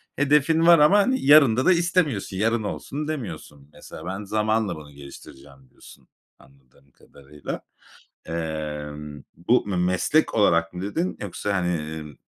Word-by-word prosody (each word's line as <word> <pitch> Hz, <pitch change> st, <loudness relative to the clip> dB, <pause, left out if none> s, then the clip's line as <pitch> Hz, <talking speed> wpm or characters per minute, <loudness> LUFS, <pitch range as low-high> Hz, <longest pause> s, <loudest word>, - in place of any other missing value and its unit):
hedefin 150 Hz, +3 st, +2 dB
var 170 Hz, -2 st, +7 dB
ama 195 Hz, +7 st, +5 dB
yarında 140 Hz, -, +5 dB
da -, -, +5 dB
istemiyorsun. 170 Hz, -, 0 dB
Yarın 115 Hz, +2 st, 0 dB
olsun 145 Hz, +8 st, -5 dB
demiyorsun. 95 Hz, -, -7 dB
Mesela, -, -, -12 dB
"Ben, 95 Hz, +3 st, -5 dB
zamanla 110 Hz, +1 st, -1 dB
bunu 75 Hz, -2 st, -12 dB
geliştireceğim." 70 Hz, -1 st, -14 dB
diyorsun -, -, -18 dB, 0.3 s
anladığım 70 Hz, +1 st, -25 dB
kadarıyla. 70 Hz, +3 st, -10 dB, 0.6 s
Emm, 75 Hz, -3 st, -6 dB
bu 110 Hz, +7 st, +1 dB
"m 100 Hz, -, -2 dB
meslek 90 Hz, -, +1 dB
olarak" 85 Hz, -6 st, +2 dB
mı 90 Hz, -, -6 dB
dedin 160 Hz, -, -3 dB
yoksa, 100 Hz, +1 st, -4 dB
hani, 90 Hz, -2 st, 0 dB, 0.3 s
iii, 75 Hz, -2 st, -12 dB
95 Hz, 130 wpm, -23 LUFS, -, 0.6 s, var